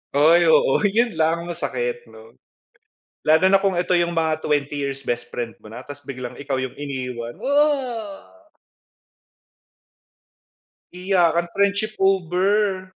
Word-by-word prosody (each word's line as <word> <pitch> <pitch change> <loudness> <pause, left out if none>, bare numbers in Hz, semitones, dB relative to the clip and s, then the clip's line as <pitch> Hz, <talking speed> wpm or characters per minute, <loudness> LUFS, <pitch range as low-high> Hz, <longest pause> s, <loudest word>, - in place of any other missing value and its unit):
Ay, 165 +4 +5
oo 160 -4 +4
'yon 230 +1 0
lang 165 +2 +1
masakit 125 -8 -4
'no, 110 0 -15 1.0
lalo 160 +3 +5
na 195 - +5
kung 195 -2 0
eto 180 +1 0
yung 170 -1 +1
mga 160 -1 0
20 145 -1 -1 0.2
years 135 -1 -7
best 120 0 -3
friend 120 -2 -5
mo 110 - -14
na 120 +4 -10
tas 145 -1 -10
biglang 130 -3 -7
ikaw 140 -1 -2
yung 130 -1 -3
iniwan, 125 -4 -5
ah. 265 -8 0 2.7
Iyakan 175 -2 +1
friendship 200 +2 +1
over. 190 +1 +1
165 Hz, 125 wpm, -22 LUFS, 130-195 Hz, 2.7 s, Ay